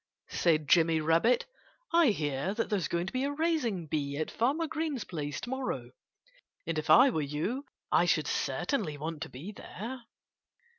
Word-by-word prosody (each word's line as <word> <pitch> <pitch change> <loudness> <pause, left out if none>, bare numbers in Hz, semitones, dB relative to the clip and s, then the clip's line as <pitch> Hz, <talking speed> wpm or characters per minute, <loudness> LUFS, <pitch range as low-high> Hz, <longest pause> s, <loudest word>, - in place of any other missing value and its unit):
said 155 -4 +2
Jimmy 165 +1 +4
Rabbit. 165 +10 +3 0.5
"I 335 -2 +6
hear 155 - 0
that 230 - -2
there's 195 -6 +1
going 170 0 -1
to 190 - -6
be 255 +1 0
a 280 - 0
raising 285 - 0
bee 145 -2 -2
at 155 - -2
Farmer 280 +8 +1
Green's 310 -5 -2
place 145 -4 -4
to - - -6
morrow. 265 0 -3 0.7
And 165 -2 -1
if 155 - -6
I 260 +2 +8
were 160 - 0
you 155 - -2 0.3
I - - +5
should - - +2
certainly 155 - -1
want 160 +1 -5
to 160 - -4
be 155 +11 -8
there." 235 +5 -7
185 Hz, 170 wpm, -30 LUFS, 155-260 Hz, 0.7 s, I